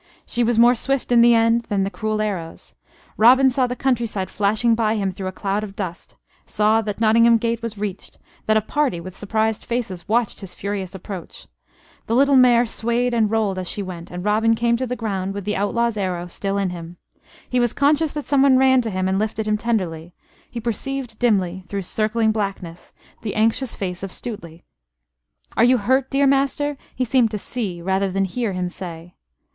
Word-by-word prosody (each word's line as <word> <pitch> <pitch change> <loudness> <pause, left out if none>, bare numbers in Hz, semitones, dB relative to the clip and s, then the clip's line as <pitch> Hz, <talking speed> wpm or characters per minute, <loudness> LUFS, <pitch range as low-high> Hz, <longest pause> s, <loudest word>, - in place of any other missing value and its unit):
She 240 - 0
was 235 0 +1
more 240 +1 +6
swift 265 +1 -2
in 240 -1 +6
the 235 0 +6
end 230 +1 +3
than 200 -2 +1
the 195 - -2
cruel 215 0 -2
arrows. 185 -6 -5 0.4
Robin 260 +4 +6
saw 255 0 +1
the 250 - -4
countryside 235 -7 -1
flashing 215 +3 +2
by 225 -1 +1
him 195 -3 -1
through 185 +1 -6
a - - -3
cloud 200 +2 -2
of 200 -2 -8
dust; 185 -4 -6 0.3
saw 215 +1 +2
that 210 -1 -5
Nottingham 230 +1 +5
gate 230 +1 -2
was 230 -2 -5
reached; 200 -2 -5 0.3
that 215 0 +4
a - - +2
party 265 - -1
with 185 +2 -9
surprised 220 +1 -1
faces 215 -8 -4
watched 230 0 +1
his 195 -2 -9
furious 195 -2 -4
approach. 190 -2 -8 0.6
The 230 - 0
little 280 +2 +4
mare 245 -2 +6
swayed 235 +2 -1
and 225 -3 +2
rolled 210 -4 0
as 185 - -4
she 205 - -3
went, 175 -3 -8
and 180 +1 -7
Robin 220 +2 +3
came 235 +1 +1
to 260 +1 -2
the 250 - -3
ground, 195 -4 -3
with 200 -2 -5
the 210 - -1
outlaw's 230 +3 0
arrow 180 -3 -2
still 195 +3 -3
in 195 -2 0
him. 170 0 -9 0.5
He 250 - 0
was 240 -2 +2
conscious 295 +2 +2
that 295 -1 -5
someone 275 -2 +4
ran 260 -1 +5
to 230 - -3
him 185 -2 -1
and 190 +1 +1
lifted 215 0 -2
him 215 - +2
tenderly: 180 -7 -2 0.3
he 240 - -6
perceived 240 +1 -4
dimly, 190 -6 +1
through 200 -1 -4
circling 220 +3 0
blackness, 195 -5 -5 0.3
the 210 - -4
anxious 225 +3 +1
face 180 -2 -4
of 195 - -5
Stuteley. 170 -9 -8 0.9
"Are - - +4
you 250 +2 +5
hurt, 260 +4 +1
dear 280 0 +2
master?" 275 +1 +1 0.2
he 255 - 0
seemed 245 -1 +3
to 215 - -3
see, 195 -6 -5
rather 190 +1 0
than 195 +1 0
hear, 220 +2 -2
him 180 -1 -2
say. 175 -1 -9
215 Hz, 200 wpm, -21 LUFS, 195-240 Hz, 0.9 s, more